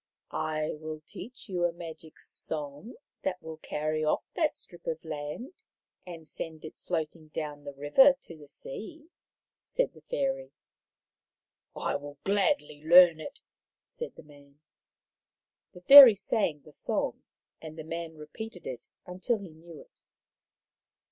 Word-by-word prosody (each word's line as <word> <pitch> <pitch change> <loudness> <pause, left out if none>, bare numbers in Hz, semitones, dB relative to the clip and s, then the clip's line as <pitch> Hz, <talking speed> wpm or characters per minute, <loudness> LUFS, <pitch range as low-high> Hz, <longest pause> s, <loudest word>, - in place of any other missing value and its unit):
" - - -28
I 155 -1 -1
will 155 0 -6
teach 250 0 -9
you 180 -3 -2
a 175 - +3
magic 165 -2 -10
song 150 - -4 0.3
that 185 -1 -2
will 160 0 -8
carry 155 0 -2
off 155 - +1
that 320 -4 +1
strip 175 - -7
of 160 0 -3
land 160 - -6 0.4
and 165 -3 -9
send 160 -1 -6
it 155 - -10
floating 160 -2 -3
down 150 -1 -6
the 140 - -6
river 150 - +6
to 165 - -10
the 150 -2 -14
sea," 345 - -8 0.5
said - - -1
the - - -17
fairy. - - -2 0.7
" - - -61
I - - -1
will 145 0 -10
gladly 180 -7 +1
learn 170 0 +8
it," 275 - -8 0.4
said 480 - -8
the - - -12
man. 145 -1 -19 1.1
The 180 - -13
fairy 270 +1 +12
sang 190 -6 -1
the 155 - -16
song, - - -2 0.4
and 160 0 -9
the 160 - -6
man 165 0 -5
repeated 180 +4 -9
it 125 - -7 0.2
until 185 +6 -1
he 200 -3 -9
knew 165 -1 -13
it. - - -22
160 Hz, 150 wpm, -29 LUFS, 155-205 Hz, 1.1 s, fairy